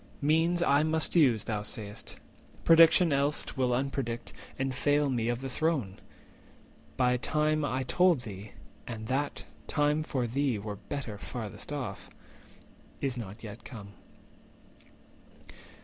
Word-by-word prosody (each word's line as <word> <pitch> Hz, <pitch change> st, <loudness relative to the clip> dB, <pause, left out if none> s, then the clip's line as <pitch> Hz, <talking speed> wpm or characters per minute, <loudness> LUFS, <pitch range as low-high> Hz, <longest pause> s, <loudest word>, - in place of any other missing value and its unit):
Means 165 Hz, +4 st, +3 dB
I 140 Hz, -2 st, +4 dB
must 160 Hz, +2 st, +1 dB
use, 125 Hz, -10 st, +5 dB
thou 105 Hz, -2 st, -2 dB
say'st; 105 Hz, +1 st, -6 dB, 0.5 s
prediction 165 Hz, 0 st, +6 dB
else 140 Hz, +2 st, 0 dB
Will 130 Hz, -1 st, +1 dB
unpredict, 120 Hz, -2 st, -2 dB, 0.2 s
and 135 Hz, 0 st, -1 dB
fail 145 Hz, +2 st, +2 dB
me 120 Hz, -2 st, 0 dB
of 120 Hz, +1 st, -1 dB
the 135 Hz, -, -4 dB
throne! 135 Hz, -, -1 dB, 1.0 s
My 125 Hz, -1 st, +3 dB
time, 155 Hz, +3 st, +1 dB
I 130 Hz, -2 st, -1 dB
told 175 Hz, +1 st, +3 dB
thee 105 Hz, -2 st, -8 dB, 0.3 s
(and 110 Hz, -2 st, -6 dB
that 140 Hz, +3 st, -1 dB, 0.2 s
time 150 Hz, +1 st, +2 dB
for 135 Hz, -5 st, -1 dB
thee 130 Hz, 0 st, 0 dB
Were 105 Hz, 0 st, -5 dB
better 115 Hz, -4 st, -6 dB
farthest 110 Hz, +3 st, -7 dB
off), 130 Hz, -9 st, -5 dB, 0.9 s
is 135 Hz, -3 st, -1 dB
not 110 Hz, -2 st, -7 dB
yet 105 Hz, 0 st, -9 dB
come. 105 Hz, -5 st, -9 dB
130 Hz, 130 wpm, -30 LUFS, 115-150 Hz, 1.0 s, prediction